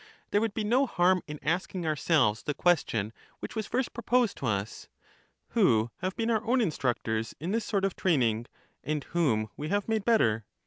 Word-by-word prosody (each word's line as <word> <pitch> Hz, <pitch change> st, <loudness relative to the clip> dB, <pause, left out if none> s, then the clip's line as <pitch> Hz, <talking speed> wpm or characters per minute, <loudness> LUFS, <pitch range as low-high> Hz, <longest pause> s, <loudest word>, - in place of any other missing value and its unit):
There 205 Hz, -, +3 dB
would 225 Hz, -2 st, -1 dB
be 220 Hz, -, -1 dB
no 250 Hz, +6 st, +2 dB
harm 180 Hz, -2 st, +3 dB
in 150 Hz, 0 st, -6 dB
asking 175 Hz, +3 st, -1 dB
ourselves 150 Hz, -7 st, +2 dB
the 150 Hz, -, -3 dB
question 115 Hz, -, +1 dB, 0.3 s
which -, -, -7 dB
was 220 Hz, -2 st, -3 dB
first 255 Hz, +1 st, -1 dB
proposed 240 Hz, -1 st, +1 dB
to 130 Hz, -, -3 dB
us: 100 Hz, -1 st, -3 dB, 0.6 s
Who 110 Hz, +1 st, +3 dB
have 185 Hz, +1 st, -3 dB
been 230 Hz, 0 st, 0 dB
our 220 Hz, -1 st, +1 dB
own 250 Hz, +3 st, +2 dB
in 220 Hz, -7 st, +2 dB
structors 115 Hz, -5 st, -2 dB
in 165 Hz, +6 st, -3 dB
this 225 Hz, 0 st, -2 dB
soii; 200 Hz, -3 st, +1 dB
of 195 Hz, -, -2 dB
training, 120 Hz, -, +1 dB, 0.4 s
and 150 Hz, -1 st, -2 dB
whom 120 Hz, -12 st, 0 dB
we 150 Hz, +1 st, -5 dB
have 205 Hz, +1 st, 0 dB
made 220 Hz, -2 st, 0 dB
better? 115 Hz, -, +3 dB
175 Hz, 190 wpm, -29 LUFS, -, 0.6 s, There